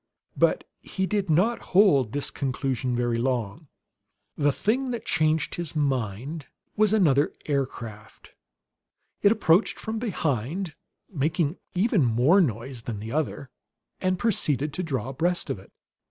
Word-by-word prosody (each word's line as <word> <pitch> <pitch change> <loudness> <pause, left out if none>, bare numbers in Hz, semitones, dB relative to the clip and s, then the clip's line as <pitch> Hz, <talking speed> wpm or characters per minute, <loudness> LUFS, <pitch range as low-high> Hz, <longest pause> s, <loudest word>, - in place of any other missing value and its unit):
But - - +2 0.2
he 190 - -2
did 200 -2 -1
not 190 +10 +3 0.2
hold 150 - +6
to - - -16
this 145 - -2
conclusion 130 -2 -2
very 120 -1 0
long. 125 +2 -2 0.7
The 145 0 +2
thing 250 - 0
that 240 -2 -4
changed 155 0 +1
his 170 -2 -4
mind 135 +1 -2 0.3
was 215 -1 +3
another 155 -9 +3
aircraft. 125 -7 -4 0.9
It 200 - +5
approached 200 -3 +3
from 220 0 -4
behind, 160 - -2 0.3
making 155 0 -1 0.2
even 195 - +3
more 125 - +4
noise 125 - -2
than 115 -3 -5
the 110 +2 -6
other, 145 -2 -2 0.5
and 185 0 0
proceeded 150 - +1
to 185 - -2
draw 135 -8 -2
abreast 170 +6 -1
of - - -4
it. 95 - -17
150 Hz, 140 wpm, -26 LUFS, 125-185 Hz, 0.9 s, hold